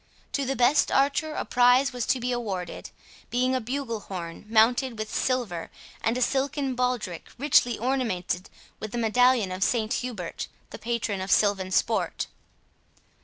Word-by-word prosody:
To 280 - -1
the 270 +1 -1
best 250 +4 +3
archer 295 +3 +2
a - - -2
prize 250 +2 +4
was 245 -2 -3
to 260 - +2
be 250 +1 -2
awarded, 200 -8 -4 0.4
being 255 +2 +1
a 260 - 0
bugle 240 -1 -3
horn, 175 -3 -7
mounted 230 +2 +3
with 215 0 -5
silver, 235 -10 -1 0.3
and 225 +2 +1
a 255 - +2
silken 275 0 0
baldric 250 -8 -2
richly 250 -3 +3
ornamented 220 -8 -1 0.3
with 215 +1 -6
a - - -1
medallion 235 -2 +3
of 185 +1 -1
St 220 -1 +1
Hubert, 215 -9 -4 0.2
the - - -8
patron 225 -4 -2
of 190 - -4
silvan 195 -1 +3
sport. 185 - 0
240 Hz, 155 wpm, -26 LUFS, 205-255 Hz, 0.4 s, prize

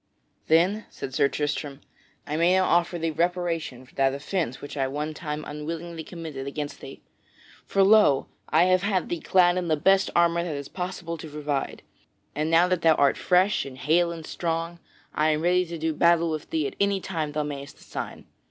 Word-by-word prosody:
"Then," 180 +7 +3
said 130 - -7
Sir 140 - +3
Tristram, 145 -1 -3 0.5
"I 150 -2 -3
may 170 +3 +3
now 190 - +4
offer 175 0 +2
thee 165 -1 -1
reparation 165 -5 -2
for - - -22
that 135 0 +1
offence 150 -2 -3
which 145 - -8
I 135 -2 0
one 150 +3 -3
time 150 -1 -5
unwillingly 165 +2 -6
committed 155 -6 -7
against 145 +1 -5
thee. - - -11 0.6
For 195 - +3
lo! 195 -9 +5 0.2
I 160 +2 +4
have 185 0 +3
had 195 -2 0
thee 175 - -2
clad 180 0 +3
in 180 -1 -2
the 155 -2 +2
best 190 +5 +3
armor 170 0 +3
that 165 -4 -3
it - - -3
is 140 - -7
possible 180 -2 -5
to 160 - -8
provide, 145 -2 -3 0.5
and 155 +2 -1
now 165 +2 +5
that 180 -2 0
thou 160 -1 +5
art 140 -1 +3
fresh 185 +3 +2
and 130 -2 -9
hale 170 +6 +2
and 165 -2 -7
strong, 165 +1 -3 0.3
I 155 +1 +2
am 155 0 +1
ready 180 +1 +2
to 170 0 -6
do 160 0 -1
battle 170 +1 +3
with 155 -1 -5
thee 155 -2 0
at - - -4
any 200 -1 +2
time 160 -6 -4
thou 150 0 0
mayst 140 -1 -7
assign. - - -7
165 Hz, 200 wpm, -26 LUFS, 150-175 Hz, 0.6 s, lo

